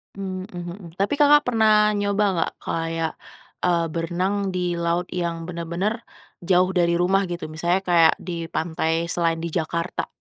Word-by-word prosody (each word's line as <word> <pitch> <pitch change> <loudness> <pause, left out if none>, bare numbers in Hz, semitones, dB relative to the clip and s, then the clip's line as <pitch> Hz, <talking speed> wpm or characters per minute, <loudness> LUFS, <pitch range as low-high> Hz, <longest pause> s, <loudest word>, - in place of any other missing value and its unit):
Mmm 190 -1 -5
mmm, 175 -1 -7
mhm, 175 -4 -10
tapi 200 +8 0
Kakak 295 0 +6
pernah 215 -3 +4
nyoba 205 0 0 0.2
gak - - 0
kayak, 165 -1 -2 0.5
eee, 170 -2 +2
berenang 175 +4 -1 0.2
di - - 0 0.2
laut 170 +1 0
yang 170 -2 -2
bener-bener, 175 +6 -3 0.4
jauh 180 +1 +3
dari 175 -2 +2
rumah 195 +2 +2
gitu 175 -3 -5
misalnya 175 +4 0
kayak 170 -3 +5
di 170 -2 -4
pantai 165 +1 -1
selain 165 -1 0
di 170 - -2
Jakarta? 170 +1 -2
175 Hz, 155 wpm, -23 LUFS, 170-195 Hz, 0.5 s, Kakak